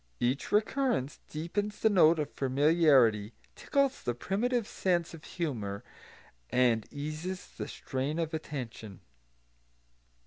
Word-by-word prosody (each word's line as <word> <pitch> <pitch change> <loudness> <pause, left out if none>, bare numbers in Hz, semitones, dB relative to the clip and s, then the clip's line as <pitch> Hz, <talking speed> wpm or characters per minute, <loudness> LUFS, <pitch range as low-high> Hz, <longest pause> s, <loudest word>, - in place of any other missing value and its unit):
Each 125 +3 0
recurrence 215 - +1
deepens 205 +7 -3
the 220 - +4
note 170 -4 +6
of 150 -1 -2
familiarity, 135 -6 +3 0.2
tickles 275 -1 0
the 120 - -2
primitive 225 - -1
sense 175 -3 0
of 160 -2 -11
humour, 110 - -4 0.7
and 120 -3 +2
eases 155 +6 -5
the - - -6
strain 135 +4 -3
of 165 -1 -2
attention. 120 - -6
155 Hz, 110 wpm, -30 LUFS, 125-185 Hz, 0.7 s, note